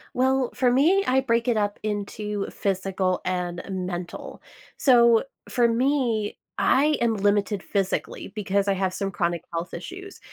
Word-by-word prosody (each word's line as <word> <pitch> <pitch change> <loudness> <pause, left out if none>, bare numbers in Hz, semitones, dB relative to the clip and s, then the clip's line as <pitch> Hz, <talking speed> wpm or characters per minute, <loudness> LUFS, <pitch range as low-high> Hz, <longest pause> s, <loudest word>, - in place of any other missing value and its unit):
Well, 260 0 +2
for 250 -2 +2
me, 340 +10 +4
I 265 +1 +3
break 235 -1 0
it 235 -3 +2
up 205 -1 -1
into 210 -1 -3
physical, 190 -1 -1
and 180 -1 -2
mental. 180 -1 -5 0.4
So, 235 -4 +5 0.3
for 240 -2 +3
me, 235 -3 0 0.2
I 300 +3 +3
am 230 -2 +2
limited 205 0 +1
physically, 195 -2 -2
because 200 -1 0
I 200 - +3
have 190 -1 -1
some 195 0 -2
chronic 175 -2 -1
health 165 +1 -4
issues, 375 - -8
210 Hz, 145 wpm, -25 LUFS, 190-250 Hz, 0.4 s, So